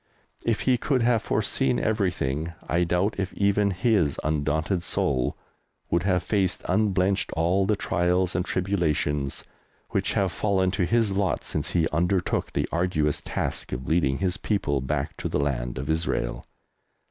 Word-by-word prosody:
If 115 -2 0
he 125 -2 +2
could 130 -2 +1
have 115 -2 +3
foreseen 125 +4 +1
everything 85 -7 -1
I 85 +1 +2
doubt 90 +5 +1
if 95 -1 -1
even 100 0 +2
his 95 - +1
undaunted 80 +4 0
soul 65 -6 0 0.5
would 85 - +3
have 90 -1 +1
faced 95 -4 0
unblenched 95 -1 +1
all 90 +4 +2
the 105 - +3
trials 90 -1 +1
and 90 - +1
tribulations 80 -7 -1 0.5
which - - 0
have 95 -3 +1
fallen 95 +1 +1
to 90 - 0
his 115 -1 +2
lot 95 -2 0
since - - -3
he 85 -2 +3
undertook 90 +3 0
the - - 0
arduous 80 -4 0
task - - -3
of 65 +1 -4
leading 70 -5 +2
his 90 -2 -1
people 70 -10 0
back 65 - -2
to - - -3
the - - 0
Land 60 -3 -1
of 65 +2 -4
Israel. 80 -6 -1
90 Hz, 155 wpm, -26 LUFS, 80-100 Hz, 0.5 s, have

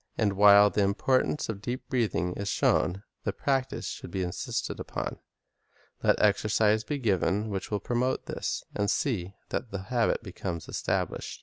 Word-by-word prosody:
And 100 -2 +2
while 100 +1 +7
the 105 - +1
importance 130 +9 +1
of 105 -3 -5
deep 120 +4 -4
breathing 90 -8 0
is 100 +2 -5
shown, 95 +1 +2 0.2
the - - 0
practise 135 -2 -1
should - - -6
be 95 - -2
insisted 90 -1 -3
upon. - - -4 0.8
Let - - +3
exercises 105 +1 +3
be 145 - -2
given 105 -3 +1
which 95 -1 -3
will 105 - -1
promote 125 +3 0
this, - - -3
and 105 0 0
see 100 -9 -1
that 120 - -3
the 100 -2 -5
habit 120 -1 +2
becomes 90 -4 -5
established. - - -2
105 Hz, 160 wpm, -28 LUFS, 95-120 Hz, 0.8 s, while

